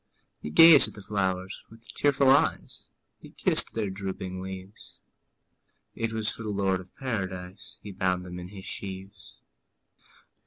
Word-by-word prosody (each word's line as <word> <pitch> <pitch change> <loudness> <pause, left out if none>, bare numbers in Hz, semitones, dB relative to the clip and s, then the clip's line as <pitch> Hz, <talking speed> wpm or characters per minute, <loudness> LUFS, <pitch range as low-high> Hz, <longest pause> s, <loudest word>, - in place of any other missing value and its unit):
'' - - -49
He - - -5
gazed 160 - +9
at - - -10
the 100 - -11
flowers 95 -2 -2
with 115 +1 -17
tearful 140 -2 +3
eyes, 145 +3 +1 0.3
He - - -13
kissed - - 0
their 105 -4 -2
drooping 95 -1 -5
leaves; 95 +1 -10 1.0
It 115 0 -3
was 110 -1 -3
for - - -9
the 110 - -5
Lord 100 -2 0
of 90 - -18
Paradise 95 -6 -5
He 105 - -8
bound 90 -1 -1
them 90 0 -7
in 90 - -8
his 95 0 -11
sheaves. 95 +1 -8
95 Hz, 155 wpm, -27 LUFS, 95-110 Hz, 1.0 s, gazed